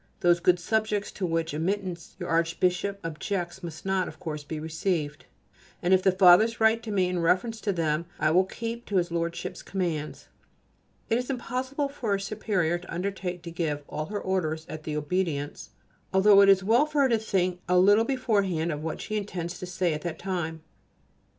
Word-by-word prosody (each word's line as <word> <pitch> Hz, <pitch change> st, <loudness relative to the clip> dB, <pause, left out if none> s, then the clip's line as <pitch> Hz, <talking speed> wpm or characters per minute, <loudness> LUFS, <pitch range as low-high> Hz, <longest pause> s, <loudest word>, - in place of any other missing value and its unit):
Those 175 Hz, 0 st, +4 dB
good 180 Hz, +1 st, +4 dB
subjects 215 Hz, +2 st, 0 dB
to 185 Hz, -, -3 dB
whose 165 Hz, -1 st, -1 dB
admittance 180 Hz, +2 st, -3 dB
your -, -, -5 dB
Archbishop 175 Hz, +4 st, +1 dB
objects 175 Hz, +3 st, -3 dB
must 165 Hz, -2 st, -8 dB
not, 190 Hz, -1 st, +1 dB
of -, -, -10 dB
course, 155 Hz, -4 st, -5 dB
be 155 Hz, +1 st, -5 dB
received, 160 Hz, -1 st, -2 dB, 0.5 s
and 180 Hz, +2 st, +2 dB
if 185 Hz, -, +5 dB
the 190 Hz, -, +4 dB
Fathers 190 Hz, +5 st, +6 dB
write 220 Hz, +1 st, +4 dB
to 230 Hz, -2 st, -6 dB
me 190 Hz, -3 st, +2 dB
in 180 Hz, -1 st, -1 dB
reference 190 Hz, +7 st, +1 dB
to 205 Hz, -, 0 dB
them 165 Hz, -2 st, -1 dB
I 155 Hz, -, +3 dB
will 185 Hz, +3 st, +4 dB
keep 230 Hz, +4 st, -6 dB
to 205 Hz, -, -3 dB
his 175 Hz, -2 st, +1 dB
Lordship's 170 Hz, 0 st, -3 dB
commands. 170 Hz, -6 st, -3 dB, 0.8 s
It 230 Hz, -, +2 dB
is 250 Hz, -, -5 dB
impossible 260 Hz, +2 st, -2 dB
for 235 Hz, -7 st, -2 dB
a -, -, -2 dB
superior 195 Hz, -4 st, -1 dB
to 175 Hz, -, -12 dB
undertake 180 Hz, -1 st, -3 dB
to 170 Hz, -, -7 dB
give 155 Hz, -4 st, -2 dB
all 155 Hz, 0 st, -4 dB
her 205 Hz, 0 st, -3 dB
orders 160 Hz, -5 st, -1 dB
at 155 Hz, 0 st, -8 dB
the 155 Hz, -, -3 dB
Obedience[A] 150 Hz, -2 st, -2 dB, 0.4 s
although 200 Hz, +1 st, +6 dB
it 200 Hz, -, +6 dB
is 195 Hz, -1 st, +5 dB
well 235 Hz, +9 st, +4 dB
for 300 Hz, -1 st, +1 dB
her 265 Hz, -, +3 dB
to 230 Hz, -2 st, +3 dB
think 185 Hz, -4 st, 0 dB
a 180 Hz, -, +4 dB
little 205 Hz, +4 st, +6 dB
beforehand 200 Hz, -10 st, 0 dB
of 150 Hz, -1 st, -4 dB
what 160 Hz, 0 st, -4 dB
she 215 Hz, -, -4 dB
intends 180 Hz, -4 st, -4 dB
to 180 Hz, -, -6 dB
say 180 Hz, -2 st, 0 dB
at 150 Hz, -, -4 dB
that 170 Hz, -2 st, -4 dB
time. 165 Hz, -4 st, -3 dB
180 Hz, 195 wpm, -27 LUFS, 165-205 Hz, 0.8 s, Fathers